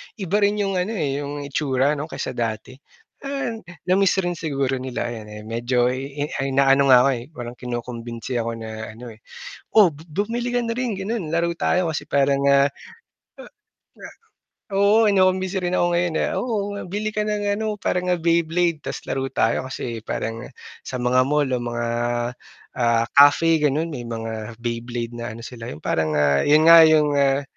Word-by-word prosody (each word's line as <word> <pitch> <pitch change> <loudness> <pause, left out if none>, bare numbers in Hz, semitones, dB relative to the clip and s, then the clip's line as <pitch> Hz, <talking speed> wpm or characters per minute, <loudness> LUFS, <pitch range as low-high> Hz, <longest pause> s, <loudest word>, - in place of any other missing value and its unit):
Iba 200 -1 -1
rin 205 0 +2
'yung 195 -3 -1
ano, 205 +5 -2
eh, 145 -6 -1
'yung 145 0 -5
itsura 140 0 +1
'no 150 - -4
kaysa - - -5
dati. 115 +3 -4 0.4
Ah, 275 -3 -3 0.3
na-miss 190 +1 +3
rin 175 -1 -3
siguro 135 -4 -1
nila 125 -2 -4
ayan, 110 -2 -8
eh, 105 0 -9
medyo 120 +2 0
i 140 +3 -4
inaano 135 0 +3
nga 130 -2 +8
ako, - - +3
eh, 120 -3 -3
parang 120 0 -7
kinukumbinsi 120 0 -5
ako 115 0 -3
na 110 -1 -7
ano, 115 +2 -10
eh, 110 - -16 0.6
"Oh, 200 - +7
bu 155 0 -11 0.2
bumili 240 +1 -2
ka 245 - +1
na 230 -1 -3
rin 250 -2 -1
gano'n 195 -4 -4
laro 170 +1 +1
tayo," 180 +1 +1
kasi 160 - -3
parang 140 0 +1
nga 140 0 +5 0.5
ha - - -16 0.6
nga. - - -9 0.7
Oo, 205 +3 +4
kinukumbinsi 190 -1 +2
rin 180 0 -1
ako 175 - +3
ngayon, 170 -1 0
ah, - - -3
"Oh, 220 -5 -1 0.2
bili 210 +2 -2
ka 210 - 0
ng 210 -1 -2
ano, 215 -1 -2
parang 180 -1 -1
nga 180 - +3
Beyblade 170 -1 +1
tas - - -5
laro 135 0 -2
tayo." 120 -1 +1
Kasi 115 -3 -5
parang 115 +1 -4 0.4
sa 130 - -5
mga 125 +1 +3
mall 145 +2 +1
o - - 0
mga, 120 0 -3 0.9
ah, 115 -1 +2
cafe 150 +3 +6
gano'n 150 +2 +1
may 130 -6 -6
mga 115 -1 -6
Beyblade 120 0 -4
na 120 0 -5
ano 115 - -10
sila, 115 -2 -8
'yung 70 - -8
parang 80 -1 0
nga 70 -1 +3
'yun 155 +2 +4
nga, 165 0 +10
'yung, 155 -2 +5
ah 140 0 +2
140 Hz, 180 wpm, -22 LUFS, 120-180 Hz, 0.9 s, nga